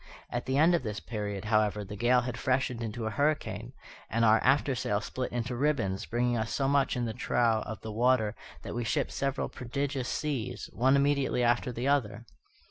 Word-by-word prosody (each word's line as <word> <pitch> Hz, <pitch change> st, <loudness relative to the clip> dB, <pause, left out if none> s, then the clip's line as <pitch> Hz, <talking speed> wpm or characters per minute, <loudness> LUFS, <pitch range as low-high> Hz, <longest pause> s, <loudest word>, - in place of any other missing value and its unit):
At 120 Hz, 0 st, -3 dB
the 130 Hz, +1 st, +1 dB
end 160 Hz, +4 st, +5 dB
of 170 Hz, -, +2 dB
this 110 Hz, -4 st, -4 dB
period, 105 Hz, -3 st, -4 dB
however, 105 Hz, -1 st, +2 dB
the 100 Hz, +1 st, -8 dB
gale 120 Hz, +4 st, +3 dB
had 125 Hz, 0 st, -4 dB
freshened 130 Hz, -2 st, 0 dB
into 115 Hz, 0 st, -4 dB
a 110 Hz, -, -1 dB
hurricane, 120 Hz, -5 st, -1 dB, 0.4 s
and 115 Hz, +1 st, +2 dB
our 110 Hz, 0 st, +6 dB
after 135 Hz, +1 st, +3 dB
sail 105 Hz, -4 st, 0 dB
split 130 Hz, +3 st, -4 dB
into 120 Hz, 0 st, -2 dB
ribbons, 120 Hz, -8 st, 0 dB
bringing 120 Hz, +1 st, +1 dB
us 110 Hz, -1 st, -2 dB
so 135 Hz, -, 0 dB
much 140 Hz, -2 st, +2 dB
in 120 Hz, -, 0 dB
the 115 Hz, -, -3 dB
trough 115 Hz, -1 st, +1 dB
of 110 Hz, -1 st, -6 dB
the 110 Hz, -, -6 dB
water 115 Hz, -1 st, +2 dB, 0.3 s
that -, -, -6 dB
we 120 Hz, -, -2 dB
shipped 110 Hz, -, 0 dB
several 140 Hz, 0 st, -1 dB
prodigious 135 Hz, +1 st, -3 dB
seas, 140 Hz, -7 st, -3 dB
one 130 Hz, +7 st, +3 dB
immediately 140 Hz, -3 st, +2 dB
after 120 Hz, +1 st, +2 dB
the 120 Hz, +2 st, -3 dB
other. 120 Hz, -5 st, 0 dB
120 Hz, 200 wpm, -29 LUFS, 110-135 Hz, 0.4 s, our